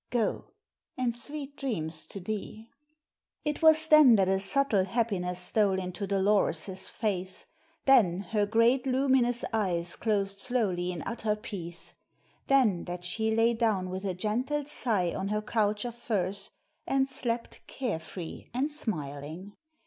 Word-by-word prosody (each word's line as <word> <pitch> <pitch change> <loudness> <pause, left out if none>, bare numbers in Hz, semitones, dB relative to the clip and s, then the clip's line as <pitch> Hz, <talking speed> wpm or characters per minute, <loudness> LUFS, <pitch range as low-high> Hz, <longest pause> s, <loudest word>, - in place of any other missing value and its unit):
Go, 235 -3 0 0.5
and 245 -2 0
sweet 285 +3 -5
dreams 175 - -2
to 200 - -6
thee." 215 +3 -6 0.7
It 300 0 -2
was 315 0 +5
then 305 -6 +8
that 195 -3 +3
a 190 0 +2
subtle 215 -2 +2
happiness 190 -4 -1
stole 195 +1 +2
into 185 +2 -4
Dolores's 190 -2 +1
face; 190 -4 -2 0.4
then 205 -10 +5
her 210 -2 +2
great 235 +4 +3
luminous 255 -2 +2
eyes 175 -5 0
closed 200 -3 0
slowly 195 -8 +1
in 175 -3 -5
utter 225 -2 -1
peace; 180 -6 -6 0.5
then 240 -10 +3
that 175 0 -5
she 220 +5 0
lay 225 +1 +3
down 215 -6 0
with 190 +1 -4
a 190 -3 -2
gentle 250 +9 -1
sigh 215 - 0
on 195 - -3
her 210 +1 -1
couch 210 0 0
of 240 - -4
furs 200 -4 -2 0.4
and 270 0 +2
slept 240 -3 -4
care 245 -11 -3
free 165 +1 -8
and 280 +4 +1
smiling. 160 - -4
210 Hz, 140 wpm, -29 LUFS, 185-245 Hz, 0.7 s, then